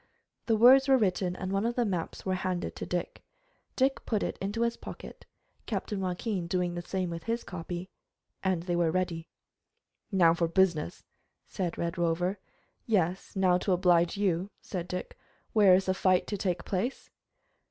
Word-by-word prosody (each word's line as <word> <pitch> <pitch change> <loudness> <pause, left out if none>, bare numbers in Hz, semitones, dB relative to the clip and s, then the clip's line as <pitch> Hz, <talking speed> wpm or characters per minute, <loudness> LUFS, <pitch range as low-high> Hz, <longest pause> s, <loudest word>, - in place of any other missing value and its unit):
The 225 - +4
words 260 +5 +7
were 270 -1 +6
written, 185 -4 0
and 185 0 -4
one 195 +1 +1
of 235 +1 0
the 245 - +1
maps 180 -5 -3
was 185 -1 0
handed 185 -1 -2
to - - -6
Dick. 175 -1 -3 0.5
Dick 270 +1 +1
put 215 -3 -1
it - - -2
into 205 +4 -2
his 235 0 0
pocket, - - -10 0.4
Captain 205 -3 -3
Joaquin 185 0 -2
doing 180 0 0
the 175 - -4
same 185 0 -3
with 165 -1 -6
his 230 +1 -1
copy, 175 0 -6 0.5
and 185 -3 0
they 175 -1 -1
were 170 -1 +2
ready. 170 -1 -2 0.8
"Now 175 -4 +5
for 170 0 0
business," 170 - +1 0.4
said 180 -3 -3
the - - -6
Red 170 +1 -2
Rover. 175 +3 0 0.5
"Yes, 185 -4 0
now 185 -2 +3
to 190 - +1
oblige 175 0 +3
you," 190 -2 0
said 180 -3 -5
Dick. 180 0 -6 0.3
"Where 200 -4 +7
is 190 +1 +1
the 185 - +1
fight 185 -1 +2
to 210 - -3
take 180 -3 -2
place?" 210 +8 -3
185 Hz, 175 wpm, -29 LUFS, 175-200 Hz, 0.8 s, words